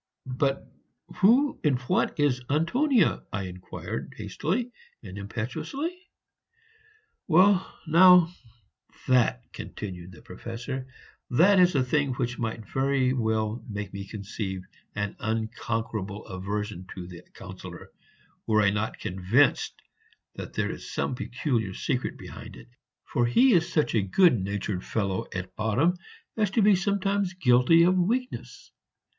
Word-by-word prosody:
"But 135 +1 -1 0.5
who 250 +8 +4
and 145 -4 +3
what 125 - 0
is 135 -4 +2
Antonia?" 210 - +2
I 100 -2 -3
inquired, 90 0 -7
hastily 235 +10 -2 0.3
and 95 -3 -9
impetuously. 120 - -4 1.3
"Well, 185 +3 +4
now, 175 +1 +7 0.7
that," 120 - +3
continued 90 -3 -7
the 80 - -15
Professor, 120 +7 -6 0.4
"that 185 +10 +5
is 180 -2 +5
a 135 - +3
thing 140 +1 +1
which 120 -1 -3
might 110 -2 -4
very 135 -1 +1
well 110 -2 -1
make 100 -2 -5
me 100 0 -6
conceive 100 -2 -5 0.3
an 105 -1 -3
unconquerable 110 -2 -3
aversion 100 0 -4
to 90 -2 -6
the 85 -1 -10
Councillor, - - -10 0.6
were 110 -1 +4
I 100 - +4
not 105 +2 -2
convinced 100 +8 +1 0.6
that - - -8
there - - -1
is - - -8
some - - -1
peculiar 120 -5 -2
secret - - -2
behind - - -10
it, - - -14 0.4
for 120 0 +1
he 250 - +5
is 175 -1 +2
such 155 -3 +1
a 110 - +3
good 120 - +4
natured 100 -1 -3
fellow 100 -4 -2
at 95 0 -6
bottom 115 +11 +2 0.4
as 210 -3 +1
to 205 +2 +2
be 205 -1 +6
sometimes 195 0 0
guilty 140 +1 +5
of 180 +2 +4
weakness. 235 +8 -2
125 Hz, 130 wpm, -27 LUFS, 105-175 Hz, 1.3 s, now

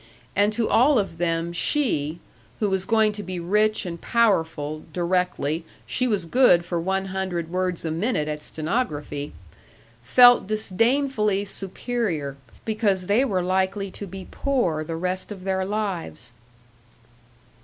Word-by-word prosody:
And 205 +2 +3
to 225 0 0
all 265 +4 +4
of 195 -6 -2
them 170 0 -1
she 170 - 0 0.4
who 210 -3 0
was 190 -1 0
going 220 -1 +3
to 210 0 -5
be 185 -2 -5
rich 210 +5 +1
and 170 -2 -6
powerful, 160 -9 +1
directly 175 -2 0 0.2
she 255 - 0
was 205 -7 0
good 175 -4 +4
for 175 -1 -2
one 190 +2 -1
hundred 175 -4 -3
words 180 -2 -1
a 160 - -1
minute 165 -2 0
at 150 0 -4
stenography! 150 - -3 0.7
felt 245 - +6
disdainfully 215 0 +1
superior, 195 - -3 0.3
because 210 -4 0
they 210 +7 +3
were 190 -9 0
likely 190 +2 0
to 200 - -7
be 190 +1 -9
poor 240 - 0
the 165 +1 -5
rest 185 +4 -3
of 190 -3 -8
their 190 0 0
lives. 190 - -4
190 Hz, 140 wpm, -24 LUFS, 170-215 Hz, 0.7 s, felt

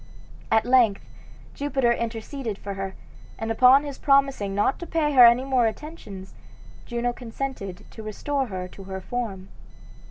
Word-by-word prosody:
At 220 0 +3
length 240 -5 +3 0.5
Jupiter 270 -4 0
interceded 230 0 -4
for 200 0 -6
her, 195 0 -5 0.4
and 225 +1 -3
upon 255 +5 +6
his 285 -2 -7
promising 275 -8 +2
not 205 +6 +1
to 345 - -7
pay 315 -2 0
her 250 -3 +9
any 240 +3 +3
more 255 -4 +2
attentions 220 - -8 0.5
Juno 240 0 -1
consented 225 -6 -6
to 220 - -10
restore 265 +6 -2
her 185 -3 -5
to 195 - -12
her 190 0 -5
form. 195 -3 -5
235 Hz, 150 wpm, -25 LUFS, 200-270 Hz, 0.5 s, her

